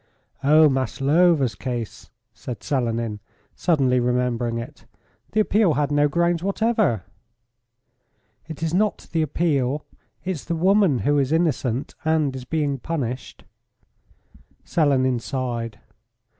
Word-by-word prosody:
"Oh! 155 +2 +6
Maslova's 140 +2 +2
case," 120 -4 -5 0.2
said 125 - -8
Selenin, 115 -6 -1 0.4
suddenly 135 -7 +2
remembering 120 -1 0
it. 115 - -8 0.5
"The 215 - +2
appeal 205 -6 +2
had 145 +1 0
no 145 0 +3
grounds 170 +2 +1
whatever." 200 - +1 1.4
"It 160 0 -7
is 165 0 -1
not 210 +3 0
the 165 - +1
appeal; 150 -3 0 0.4
it's 180 -6 -3
the 170 - -2
woman 190 -3 +3
who 145 0 +3
is 135 0 0
innocent, 145 -6 0
and 155 -4 +1
is 130 -1 -7
being 145 -2 -1
punished." 130 -5 -4 1.2
Selenin 130 -6 +2
sighed. 120 -4 -4
145 Hz, 115 wpm, -23 LUFS, 125-165 Hz, 1.4 s, Oh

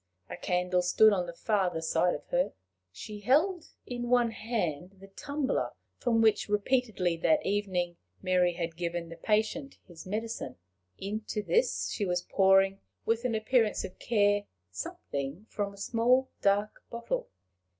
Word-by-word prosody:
A - - -3
candle 180 0 0
stood 210 +4 +5
on 180 -3 0
the - - -5
farther 185 -3 0
side 165 +2 +1
of - - -9
her. 265 +1 +1 0.4
She 210 - -8
held 310 - +2 0.2
in 240 -1 -4
one 245 -2 +4
hand 195 -7 -3
the 195 - -12
tumbler 285 +7 -2 0.3
from 225 -2 +2
which, 215 -1 +3
repeatedly 210 -5 +1
that 300 - +2
evening, 185 -4 -1 0.2
Mary 180 -2 +2
had 170 -1 -4
given 170 -1 -3
the 165 - -8
patient 220 - 0
his 175 -1 -12
medicine: 215 - -4 0.4
into 210 +1 -4
this 470 - +1
she 205 - -1
was 180 0 0
pouring, 195 0 +4 0.3
with 230 +2 0
an 235 -3 +1
appearance 220 0 +2
of 185 - -8
care, 205 -2 +2 0.3
something 140 - -5
from 205 -1 -2
a 200 - -15
small 240 +5 +2
dark 200 +1 +1
bottle. 235 0 -3
205 Hz, 150 wpm, -30 LUFS, 180-230 Hz, 0.4 s, stood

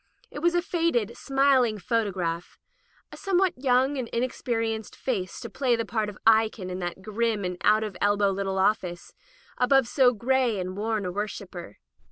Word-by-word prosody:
It - - -6
was 345 +3 +2
a 350 - +2
faded, 330 - 0
smiling 270 -5 +2
photo 225 +1 0
graph 175 -2 -4 0.3
— - - -36
2, - - -10
somewhat 380 -2 +1
young 260 +2 +2
and 245 - -3
inexperienced 230 -2 -2
face 195 -9 -3
to 235 - -5
play 245 +2 +1
the 230 0 -2
part 220 -2 -1
of 205 - -10
Eikon 220 -4 +3
in 180 - -4
that 175 +1 -5
grim 215 -1 -1
and 180 0 -2
out 215 +1 +4
at 205 -4 -5
elbow 205 -1 +3
little 195 0 -2
office, 190 -3 0 0.5
above 260 0 +4
so 255 0 +4
gray 245 -1 +1
and 185 0 -4
worn 215 0 -2
a 180 - -2
worshipper. 190 - -6
220 Hz, 180 wpm, -26 LUFS, 195-255 Hz, 0.5 s, out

